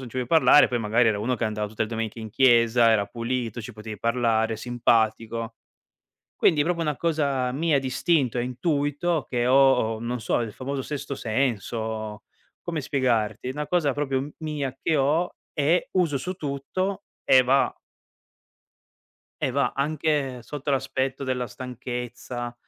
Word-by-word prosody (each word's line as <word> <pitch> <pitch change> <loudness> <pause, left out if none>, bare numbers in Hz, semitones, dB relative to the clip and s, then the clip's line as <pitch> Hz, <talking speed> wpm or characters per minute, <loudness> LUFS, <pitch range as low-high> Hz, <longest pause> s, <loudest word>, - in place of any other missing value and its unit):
non 130 - -8
ci 130 - -10
vuoi 125 -1 -1
parlare, 160 -2 +6
poi 120 - -1
magari 115 +2 +3
era 105 - +1
uno 120 +5 0
che 120 - -2
andava 105 -1 -2
tutte 110 +1 -2
le 110 - -2
domeniche 115 0 -4
in 110 -1 -7
chiesa, 120 -1 +5
era 105 -2 +3
pulito, 120 -1 -3
ci 120 +3 -8
potevi 105 -1 -8
parlare, 115 -2 +1
simpatico. 115 -1 0 0.8
Quindi 150 -3 +3
proprio 170 +1 -1
una 150 -2 0
cosa 140 -6 0
mia 150 +1 +2
d'istinto 135 -1 +1
e 120 - +1
intuito 145 +4 -1
che 120 -1 0
ho, 130 -4 +4
non 120 +1 -3
so, - - 0
il 110 -3 -5
famoso 135 +1 -4
sesto 140 0 -5
senso. 110 -3 -2 0.4
Come 165 -4 -3
spiegarti? 125 -4 0
Una 150 +2 -4
cosa 155 -5 +1
proprio 135 -2 -1
m 145 +2 -7
mia 150 -4 -3
che 160 - +1
ho 150 +6 +1 0.2
e 155 +4 +1
uso 170 -7 +2
su 180 +8 -4
tutto 185 +6 -3 0.2
e 130 -1 +6
va 135 +2 +2 1.7
e - - +1
va 140 0 +1
anche 140 -3 -1
sotto 145 +3 -5
l'aspetto 135 0 -1
della 125 -1 -1
stanchezza, 125 0 -6
130 Hz, 155 wpm, -25 LUFS, 115-145 Hz, 1.7 s, parlare